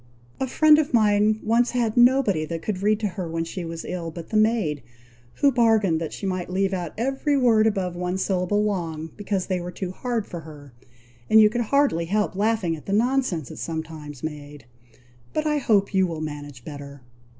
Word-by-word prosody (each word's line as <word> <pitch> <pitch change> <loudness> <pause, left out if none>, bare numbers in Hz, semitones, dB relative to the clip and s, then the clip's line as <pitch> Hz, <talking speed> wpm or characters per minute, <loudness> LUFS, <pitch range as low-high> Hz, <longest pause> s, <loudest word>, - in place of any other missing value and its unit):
A 265 - -1
friend 305 +3 +5
of 285 -5 0
mine 215 0 +3
once 235 +3 +2
had 235 -3 0
nobody 245 -9 +4
that 165 +1 -5
could 195 -3 -3
read 210 +1 +2
to 210 - +1
her 185 -3 -5
when 165 0 -2
she 175 +2 -6
was 165 0 -6
ill, 175 -2 -4
but 165 0 -9
the - - -4
maid, 215 -9 +2 0.5
who 280 - +3
bargained 220 -9 +3
that 160 - -4
she - - -6
might 185 -2 -2
leave 195 +1 0
out 175 -3 -4
every 270 +4 0
word 225 -4 +4
above 190 -5 -1
one 180 +1 -2
syllable 190 +2 0
long, 165 -6 -3
because 200 -3 -2
they 185 -2 -1
were 175 - -5
too 180 0 -5
hard 235 +1 -3
for 175 - -7
her; 145 -4 -12 0.6
and 220 - +7
you 210 -1 +6
could 240 +1 -1
hardly 280 - +2
help 205 +3 0
laughing 205 -4 0
at 150 - -13
the 200 - -1
nonsense 230 - 0
it - - -9
sometimes 160 -4 -6
made; 145 -3 -7 0.7
but 305 - -1
I 300 -1 +1
hope 205 -6 +2
you 190 -1 +3
will 165 -2 -5
manage 145 -4 -7
better." 140 -2 -9
190 Hz, 200 wpm, -24 LUFS, 165-220 Hz, 0.7 s, and